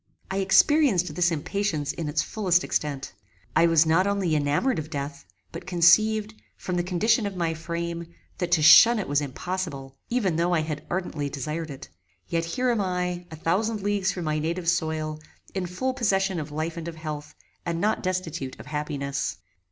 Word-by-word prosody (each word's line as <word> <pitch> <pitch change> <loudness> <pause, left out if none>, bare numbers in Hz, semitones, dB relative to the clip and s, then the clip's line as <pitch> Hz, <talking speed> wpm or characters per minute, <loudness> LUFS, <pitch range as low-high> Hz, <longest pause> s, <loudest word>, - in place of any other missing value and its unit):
I 190 - -1
experienced 195 - +4
this 175 +2 +2
impatience 165 -2 -1
in 160 -3 -4
its 145 - +1
fullest 185 -5 +1
extent. 140 -3 -2 0.4
I 170 - +5
was 165 -1 +5
not 165 +5 +3
only 195 -5 +1
enamoured 150 - +1
of 155 0 -6
death, 140 - -5 0.3
but - - -8
conceived, 210 +5 +4 0.2
from 180 - -5
the 175 - +1
condition 210 +5 +2
of 200 - -6
my 170 -2 0
frame, 170 +1 -4 0.3
that 175 -1 -2
to 155 -3 +4
shun 230 +9 +9
it 205 - -3
was 145 +1 +1
impossible, 145 -2 -5
even 205 -9 0
though 175 +1 +2
I 160 - +2
had 155 -1 -4
ardently 165 -5 -2
desired 155 +4 -4
it; 135 -2 -9 0.4
yet 165 0 -1
here 250 +8 0
am 230 -3 +1
I, 180 -1 -2
a 160 - -8
thousand 200 +7 -1
leagues 200 -1 +1
from 180 -4 -5
my 155 0 0
native 170 +3 -2
soil, 160 -2 0 0.3
in 190 -2 -2
full 255 +9 -2
possession 195 -6 +1
of 150 - -5
life 160 +3 -3
and 165 0 -5
of 170 - -6
health, 150 -1 -6 0.3
and 170 -1 -2
not 215 +4 +1
destitute 170 -7 -3
of - - -10
happiness. 140 - -3
170 Hz, 185 wpm, -26 LUFS, 155-190 Hz, 0.4 s, shun